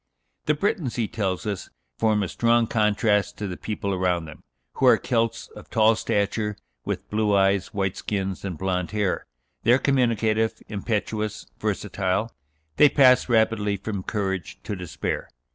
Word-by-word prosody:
The 150 - +3
Bretons, 180 - -1
he 115 -3 0
tells 95 -4 -2
us, 100 -3 -4 0.3
form 110 -2 +2
a - - -1
strong 115 +5 +2
contrast 105 -2 +1
to 105 - -3
the 90 - -4
people 100 -1 -3
around 90 -2 0
them, 75 -1 -11 0.4
who - - +3
are - - +7
"Celts 115 -2 -1
of - - -13
tall 110 0 +4
stature, 105 0 -1 0.3
with - - -4
blue 105 -1 +2
eyes, 95 -1 +2
white 95 -2 -1
skins, 95 -2 -3
and 95 -5 -4
blond 90 -1 -1
hair: 105 -3 -1 0.3
they 115 - +3
are - - +6
communicative, 115 -4 +1
impetuous, 110 0 -2
versatile; 100 +4 -1 0.4
they 150 - +7
pass 130 -3 +5
rapidly 110 -3 +2
from 100 0 -4
courage 95 -4 -3
to 105 - -4
despair. 90 -3 -4
105 Hz, 155 wpm, -25 LUFS, 95-115 Hz, 0.4 s, are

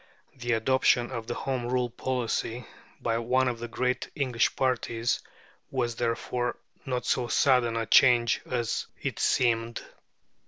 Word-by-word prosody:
The 120 -2 -1
adoption 120 +1 +2
of 115 -2 -5
a 120 - -2
Home 125 -3 -2
Rule 125 -1 +1
policy 120 -1 -2 0.3
by 115 0 0
one 130 +3 +2
of 120 -2 -2
the 120 - -5
great 125 +2 -1
English 125 -7 +1
parties 120 -2 0 0.5
was, 120 -3 -1
therefore, 120 +1 -1 0.3
not 125 -1 -2
so 125 -2 +1
sudden 120 -3 +3
a 115 - -1
change 120 -1 +5
as 120 -2 -2 0.2
it - - -3
seemed. 115 -2 +1
120 Hz, 135 wpm, -28 LUFS, 115-125 Hz, 0.5 s, change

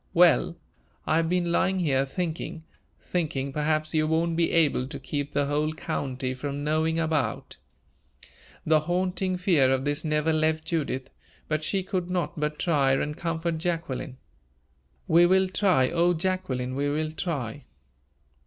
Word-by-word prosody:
Well, - - +4 0.5
I 155 - +2
have 165 0 +1
been 175 -1 +1
lying 190 +2 +2
here 135 -6 +1
thinking, 165 0 -4 0.4
thinking, 140 -6 -2
perhaps 155 +1 0
you 155 -1 +2
won't 165 +1 +1
be 165 0 +1
able 150 -6 +2
to 140 0 -6
keep 145 +1 -4
the 145 0 +1
whole 150 +2 0
county 130 -4 -3
from 140 +2 -4
knowing 160 +2 +1
about 160 -2 -1 0.5
" - - -23
The 155 0 +4
haunting 180 +3 -1
fear 165 -8 +3
of 135 +1 0
this 145 0 -1
never 155 0 +1
left 155 0 +1
Judith, 140 -6 -2 0.4
but 155 0 -1
she 190 +4 0
could 180 -2 -3
not 180 -3 -2
but 150 0 -1
try 140 -6 +2
and 150 +2 -1
comfort 165 0 -2
Jacqueline. 160 -7 -3 0.9
"We 170 +2 +6
will 190 +1 +4
try 185 -9 +2
O 175 +1 +3
Jacqueline, 160 -8 -2
we 140 +2 0
will 155 +1 -1
try!" 145 - -4
155 Hz, 155 wpm, -26 LUFS, 145-170 Hz, 0.9 s, We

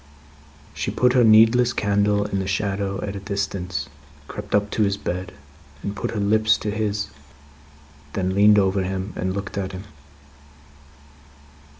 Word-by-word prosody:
She - - -3
put 125 0 +2
her 125 -2 +5
needless 115 +2 +6
candle 100 0 +1
in 100 - -2
the 95 - -3
shadow 100 0 -2
at 100 -1 -4
a - - -4
distance, 95 -6 -3 0.4
crept 105 0 -4
up 105 0 +1
to - - -1
his 100 -1 +2
bed, 90 -1 -4 0.5
and 100 - -4
put - - -3
her 110 - -3
lips 110 +1 +3
to 105 - -3
his; 105 -4 -2 1.0
then, 95 -1 -1
leaned 105 +2 +6
over 95 -1 +2
him, 95 +1 -3
and 95 +1 -2
looked 100 0 -4
at 95 -1 -4
him. 95 +1 -7
100 Hz, 155 wpm, -23 LUFS, 95-105 Hz, 1.0 s, needless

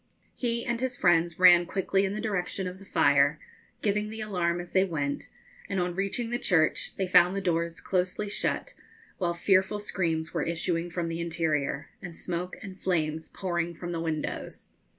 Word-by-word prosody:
He 235 -2 -2
and 235 -1 -1
his 255 -1 -2
friends 170 -3 +3
ran 175 -1 +7
quickly 195 +1 +1
in 195 +1 -2
the 215 - -3
direction 195 -3 -2
of 180 +1 -7
the 195 - -13
fire, 145 -3 +3 0.4
giving 210 0 +1
the 220 +1 -7
alarm 175 -5 0
as 175 0 -8
they 190 - +4
went, 145 -6 -2 0.4
and 195 - 0
on 180 0 0
reaching 200 +5 -2
the 240 - 0
church 160 -4 +2
they 190 - -1
found 180 0 +5
the - - 0
doors 170 -3 -1
closely 185 +3 -1
shut, 200 - -1 0.5
while 170 -2 0
fearful 190 +3 +3
screams 165 -6 -2
were - - 0
issuing 170 +1 -1
from 170 0 -2
the 165 0 -3
interior, 155 -3 -1
and 175 -3 -8
smoke 180 +1 -4
and 190 -2 -9
flames 160 -3 -1
pouring 170 -2 -2
from 175 +1 -6
the 165 -1 -2
windows. 160 -2 -4
180 Hz, 180 wpm, -28 LUFS, 165-195 Hz, 0.5 s, ran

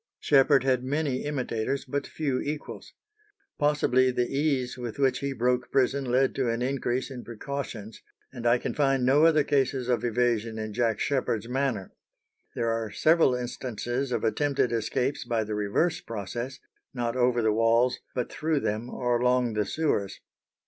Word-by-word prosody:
Sheppard 135 -1 +4
had 130 -2 +1
many 140 0 -1
imitators, 135 -2 -2
but 140 -1 -3
few 140 -5 -2
equals. 150 +1 -6 0.7
Possibly 145 -4 +3
the 125 -1 0
ease 140 -4 0
with 120 -1 -6
which 135 -2 +2
he 140 0 -2
broke 125 -1 0
prison 135 +1 +2
led 130 +2 +2
to 130 -3 0
an 115 +1 -1
increase 130 0 -1
in 125 -2 -7
precautions, 115 -2 -6 0.3
and 120 -2 -3
I 120 +1 +5
can - - -4
find 135 -3 +2
no 145 +5 +5
other 155 -2 +4
cases 135 -3 0
of 120 -2 +1
evasion 115 -2 0
in 110 -1 -4
Jack 115 -1 0
Sheppard's 115 -6 -1
manner. 125 -6 -2 0.6
There 115 -1 0
are 115 -1 -2
several 155 +2 +3
instances 125 +1 -3
of 120 -3 -1
attempted 135 +1 +1
escapes 120 +4 -1
by 115 -3 -1
the 105 0 -5
reverse 105 +11 0
process, 120 +4 -5 0.4
not 120 -1 -2
over 120 -2 +2
the 110 -1 +3
walls, 115 +3 +3 0.2
but 125 -2 -2
through 155 -2 -1
them 110 +2 -2
or 120 -2 0
along 125 -1 +2
the 105 -1 0
sewers. 145 -11 -1
125 Hz, 165 wpm, -27 LUFS, 115-135 Hz, 0.7 s, I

